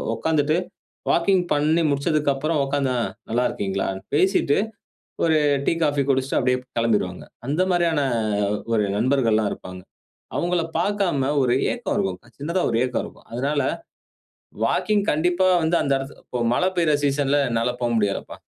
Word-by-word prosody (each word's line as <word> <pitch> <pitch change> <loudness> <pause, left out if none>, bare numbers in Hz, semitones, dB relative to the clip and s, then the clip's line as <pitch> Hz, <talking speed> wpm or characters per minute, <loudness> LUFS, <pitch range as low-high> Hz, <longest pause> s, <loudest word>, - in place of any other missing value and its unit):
உட்கார்ந்துட்டு 155 +4 +1 0.5
வாக்கிங் 185 +2 +3
பண்ணி 155 +3 +2
முடிச்சதுக்கு 145 +1 +1
அப்புறம் 150 +3 -1
உட்கார்ந்தா 135 -2 0 0.4
நல்லா 120 +2 +1
இருக்கிங்களான்? 95 -1 -2 0.2
பேசிட்டு 185 -3 +3 0.7
ஒரு 160 -1 +3 0.3
டீ - - +2
காஃபி 145 -2 +2
குடிச்சுட்டு 135 0 +1
அப்டியே 125 0 +2 0.2
கிளம்பிருவாங்க. 105 -6 0 0.2
அந்த 155 +6 +1
மாரியான 170 -3 +2 0.5
அ - - -1 0.2
ஒரு 105 -2 +2
நண்பர்கள்லாம் 115 -3 +2
இருப்பாங்க. 90 0 -9 0.5
அவங்கள 175 -1 +1 0.2
பார்க்காம 180 -8 0
ஒரு 125 -1 +2 0.2
ஏக்கம் 240 -5 -3
இருக்கும். 95 -1 -1 0.2
சின்னதா 170 +6 -1
ஒரு 115 - 0
ஏக்கம் 125 - -1
இருக்கும். - - -13
அதனால, 140 +4 0 1.0
வாக்கிங் 210 -2 +1
கண்டிப்பா 175 +4 +2 0.2
வந்து 165 +2 +2
அந்த 140 - 0
இடத்து 135 +1 -8
இப்போ 125 - -4
மழை 180 +9 +2
பெய்ற 165 -3 +3
சீசன்ல 140 0 +2
என்னால 115 +1 0
போ 120 - +1
முடியாதுப்பா. 100 -2 -1
140 Hz, 140 wpm, -23 LUFS, 125-165 Hz, 1.0 s, வாக்கிங்